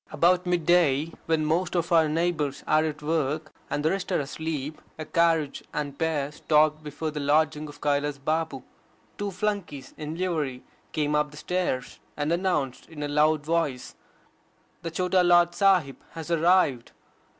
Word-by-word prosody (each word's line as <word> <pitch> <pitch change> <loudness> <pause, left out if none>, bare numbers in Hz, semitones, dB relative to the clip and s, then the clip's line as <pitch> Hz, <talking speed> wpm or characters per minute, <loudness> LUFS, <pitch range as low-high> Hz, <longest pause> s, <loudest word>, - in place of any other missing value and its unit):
About 180 +4 +3
mid 175 -2 0
day, 165 -3 +3
when 160 -1 +1
most 175 +3 0
of 170 -1 0
our 160 -2 +5
neighbours 155 -3 -1
are 155 0 +3
at 150 -1 -4
work, 155 0 -1 0.2
and 145 - -2
the 160 - +3
rest 195 0 -3
are 180 - +2
asleep, 150 0 -4 0.2
a 155 - -5
carriage 165 -4 +1
and 145 -2 -3
pair 150 -3 0
stopped 155 0 +2
before 150 +1 -4
the 150 - -5
lodging 150 +1 +1
of 145 - -13
Kailas 145 0 0
Babu. 155 -1 -2 0.6
Two 205 0 -1
flunkeys 185 -8 -3
in 155 +1 -5
livery 155 -8 -2 0.3
came 150 -1 0
up 150 0 +2
the 150 - -13
stairs, 165 -6 -2 0.2
and 145 +1 -1
announced 170 -8 -1
in 150 -2 -7
a - - -1
loud 150 +1 +2
voice, 160 -6 -1 0.9
"The 165 - -4
Chota 180 +2 +2
Lord 175 -1 +5
Sahib 185 -9 +3 0.2
hoe 165 - -5
arrived." 165 -7 +2
155 Hz, 160 wpm, -26 LUFS, 145-170 Hz, 0.9 s, our